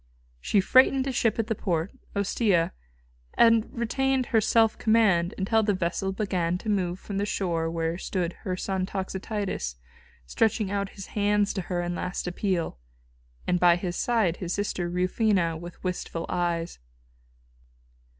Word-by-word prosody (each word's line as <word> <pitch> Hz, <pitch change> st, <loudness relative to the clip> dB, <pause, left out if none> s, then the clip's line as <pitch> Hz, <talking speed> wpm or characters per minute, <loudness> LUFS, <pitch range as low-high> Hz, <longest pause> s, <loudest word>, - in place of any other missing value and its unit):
She 200 Hz, -, +2 dB
freighted 260 Hz, +5 st, +5 dB
a 270 Hz, -, -1 dB
ship 235 Hz, -3 st, +1 dB
at 225 Hz, -, 0 dB
the 225 Hz, -, -1 dB
port, 175 Hz, -3 st, -2 dB, 0.2 s
Ostia, 200 Hz, -3 st, +1 dB, 0.6 s
and 230 Hz, -1 st, +5 dB
retained 260 Hz, +2 st, 0 dB
her 225 Hz, -2 st, +2 dB
self 225 Hz, +1 st, +3 dB
command 210 Hz, -6 st, +3 dB
until 220 Hz, +4 st, +2 dB
the 205 Hz, -2 st, +1 dB
vessel 185 Hz, +2 st, -1 dB
began 185 Hz, -4 st, -1 dB
to 215 Hz, -, -6 dB
move 185 Hz, -3 st, 0 dB
from 200 Hz, -1 st, -4 dB
the 205 Hz, -, 0 dB
shore 170 Hz, -5 st, -1 dB
where 165 Hz, +1 st, -2 dB
stood 180 Hz, -3 st, -2 dB
her 185 Hz, -2 st, -3 dB
son 190 Hz, -1 st, -2 dB
Toxotius 190 Hz, -, -3 dB, 0.5 s
stretching 215 Hz, -, +1 dB
out 200 Hz, -1 st, -1 dB
his 195 Hz, -, -6 dB
hands 205 Hz, -1 st, +2 dB
to 195 Hz, -, -2 dB
her 175 Hz, -1 st, -2 dB
in 175 Hz, 0 st, -2 dB
last 180 Hz, +1 st, -3 dB
appeal, 180 Hz, -, -2 dB, 0.7 s
and 180 Hz, -, +1 dB
by 175 Hz, -1 st, +6 dB
his 175 Hz, 0 st, -3 dB
side 220 Hz, -8 st, +1 dB
his 175 Hz, -1 st, -3 dB
sister 185 Hz, -3 st, -2 dB
Rufina, 180 Hz, -1 st, +1 dB
with 170 Hz, +2 st, -10 dB
wistful 180 Hz, -2 st, -3 dB
eyes. 170 Hz, -1 st, -1 dB
190 Hz, 150 wpm, -27 LUFS, 175-215 Hz, 0.7 s, by